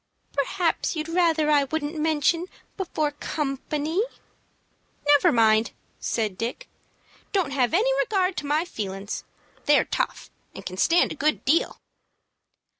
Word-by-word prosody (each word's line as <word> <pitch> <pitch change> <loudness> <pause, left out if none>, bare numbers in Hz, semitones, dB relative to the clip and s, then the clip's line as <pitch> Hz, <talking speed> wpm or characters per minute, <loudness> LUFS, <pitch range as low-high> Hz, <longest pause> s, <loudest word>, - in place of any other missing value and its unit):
"Perhaps 330 +6 0
you'd 310 0 -3
rather 330 -3 +2
I 290 -2 +4
wouldn't 300 +2 -3
mention 320 +2 +1 0.3
before 315 -6 -1
company." 295 +3 -2 1.1
"Never 290 -1 +6
mind," 220 -1 +3 0.3
said 210 -5 -2
Dick. 245 - -4 0.7
"Don't 370 -8 +1
have 260 -3 +1
any 465 +9 +3
regard 385 -5 +1
to 290 - -3
my 305 +4 +1
feelin's. 200 - -5 0.4
They're 295 0 +5
tough, - - -3 0.2
and - - -9
can 185 - -6
stand 335 - +3
a - - -4
good 305 +1 0
deal." 310 +6 +2
300 Hz, 125 wpm, -25 LUFS, 270-335 Hz, 1.1 s, Never